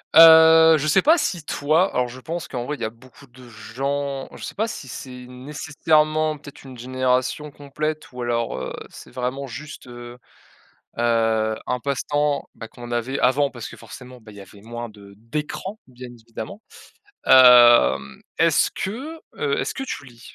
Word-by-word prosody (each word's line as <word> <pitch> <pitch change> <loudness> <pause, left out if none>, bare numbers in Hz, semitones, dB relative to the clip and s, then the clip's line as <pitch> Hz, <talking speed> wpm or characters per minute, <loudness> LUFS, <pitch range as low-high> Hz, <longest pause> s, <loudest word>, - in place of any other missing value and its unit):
Heu, 160 0 +8
je 150 - -3
sais 155 - +4
pas 320 +4 +5
si 175 - -2
toi 155 +6 +1
alors, 125 -1 0
je 125 +2 -10
pense 170 +5 -6
qu'en 125 -6 -5
vrai, 150 - -3
il - - -15
y - - -1
a 110 - -4
beaucoup 130 +4 -18
de 125 -1 -16
gens, 135 +5 -4
je - - -11
sais - - -6
pas 220 +2 -1
si 150 - -8
c'est 125 0 -9
nécessairement 150 +3 0
peut-être 145 0 -13
une 130 -2 -11
génération 130 +3 -1
complète 150 +2 -5
ou 125 - -8
alors, 120 -1 -1
heu, - - -5 0.2
c'est - - -13
vraiment 130 +2 -4
juste, 145 +2 -10
heu 120 0 -11 0.8
heu, 115 -2 +1
un 125 - -2
passe-temps, 140 +3 -1
bah, 115 - -9
qu'on 120 +1 -11
avait 120 +3 -2
avant 140 +3 +2
parce 120 -4 -8
que - - -12
forcément, 125 +3 -12
bah, 110 -1 -15
il 105 - -15
y - - -9
avait 100 +1 -15
moins 120 +1 -7
de 100 -2 -15
d'écrans, 150 - -6
bien 125 -1 -11
évidemment. 120 - -9 0.6
Hem, 125 -2 +6 0.2
est-ce - - +3
que, 265 +12 -5 0.2
heu, 455 0 0
est-ce - - -2
que 270 - -6
tu 245 - -6
lis? 120 -3 -16
130 Hz, 180 wpm, -22 LUFS, 120-150 Hz, 0.8 s, Heu